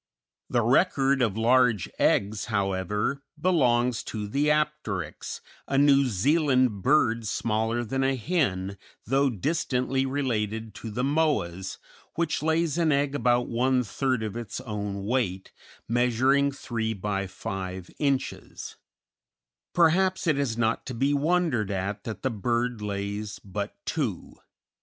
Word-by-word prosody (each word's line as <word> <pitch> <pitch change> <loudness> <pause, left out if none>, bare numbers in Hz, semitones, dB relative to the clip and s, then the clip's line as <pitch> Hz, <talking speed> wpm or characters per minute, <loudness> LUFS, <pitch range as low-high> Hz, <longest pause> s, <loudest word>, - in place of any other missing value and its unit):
The 120 - +2
record 135 - +3
of 110 -4 +1
large 120 -3 +3
eggs, 100 +1 +2
however, 100 +5 -1 0.2
belongs 125 -8 +2
to 105 -2 -4
the 140 +8 +1
Apteryx, 150 - -2 0.3
a 135 - 0
New 140 -1 +5
Zealand 130 - +2
bird 115 -4 +2
smaller 110 +4 0
than 135 +4 -1
a 135 0 +2
hen, 100 - -1 0.3
though 135 +4 +2
distantly 130 - 0
related 110 -5 -2
to 115 - -7
the 120 +4 -2
Moas, 105 - 0 0.4
which 165 -1 0
lays 160 0 +1
an 165 -2 +3
egg 140 0 +1
about 120 -2 +2
one 125 +2 +2
third 130 +2 -1
of 110 -1 -4
its 115 -4 -5
own 100 -4 -4
weight, 105 -6 -1 0.4
measuring 125 +4 +3
3 115 -5 -3
by 100 0 -2
5 95 -2 -6
inches; 140 -3 -2 0.9
perhaps 185 +3 +3
it 155 -4 +2
is 120 -5 -1
not 115 -1 +1
to 130 - -4
be 135 +4 +1
wondered 145 - +1
at 100 +1 -3
that 110 - -6
the 130 - +1
bird 120 +1 -1
lays 100 0 -4
but 100 +1 -5
two. 125 - -3
120 Hz, 130 wpm, -27 LUFS, 105-140 Hz, 0.9 s, New